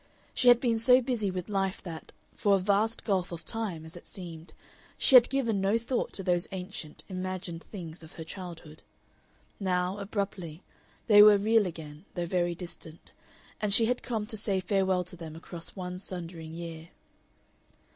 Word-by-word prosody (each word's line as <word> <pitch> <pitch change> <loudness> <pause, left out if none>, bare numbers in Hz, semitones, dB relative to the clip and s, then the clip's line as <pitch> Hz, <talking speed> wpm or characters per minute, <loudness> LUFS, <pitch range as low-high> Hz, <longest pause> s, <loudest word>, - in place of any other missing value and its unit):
She 250 - +2
had 245 -1 +8
been 230 -3 +1
so 250 +2 +6
busy 235 -5 -1
with 185 -1 -4
life 195 -2 -1
that, 165 -4 -8 0.2
for 200 -1 +3
a - - +4
vast 205 +4 +1
gulf 190 -4 0
of 170 -1 -7
time, 200 -8 -1
as 160 - -10
it 175 - -12
seemed, 170 -3 -8 0.4
she - - +3
had 245 -2 +9
given 235 -7 0
no 200 +3 +3
thought 235 +2 -2
to 195 - -5
those 175 -2 +1
ancient, 180 -5 -6
imagined 185 -2 -4
things 170 -5 -8
of 160 +2 -12
her 165 - -7
childhood. 165 -3 -9 0.8
Now, 185 0 0
abruptly, 195 -5 -4 0.4
they 205 -2 +8
were 210 -1 +9
real 215 0 +3
again, 155 -1 -9
though 175 -1 -1
very 175 0 0
distant, 170 -2 -9 0.5
and 210 -1 0
she 225 +2 +6
had 245 +2 0
come 225 -4 -2
to 220 0 -2
say 200 -2 +2
farewell 190 0 +1
to 180 +1 -10
them 165 -2 -8
across 165 0 -7
one 180 -1 -5
sundering 170 -4 -7
year. 165 -1 -7
185 Hz, 175 wpm, -29 LUFS, 170-210 Hz, 0.8 s, had